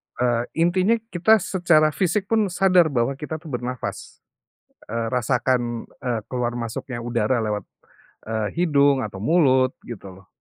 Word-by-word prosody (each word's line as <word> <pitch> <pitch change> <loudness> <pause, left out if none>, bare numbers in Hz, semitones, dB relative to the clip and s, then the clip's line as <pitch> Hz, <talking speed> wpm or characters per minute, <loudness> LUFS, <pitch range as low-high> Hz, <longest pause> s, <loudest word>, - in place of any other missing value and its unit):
Eee, 120 -1 +1
intinya 185 +6 +3 0.2
kita 185 +5 +4
secara 170 -5 +3
fisik 190 +4 0
pun 220 -2 +3
sadar 180 -2 +4
bahwa 135 0 -1
kita 155 +1 -5
tuh 160 -1 -9
bernafas. 125 0 -5 0.7
Eee, 115 0 -2
rasakan, 125 -1 0 0.2
eee, 120 -3 -1
keluar 120 -1 -2
masuknya 120 +2 -5
udara 120 0 0
lewat, 105 -1 -2 0.6
eee, 110 -1 -2
hidung 145 -5 +3
atau 100 -4 -6
mulut 130 - +3
gitu 100 -5 -9
loh. - - -29
130 Hz, 140 wpm, -23 LUFS, 120-165 Hz, 0.7 s, kita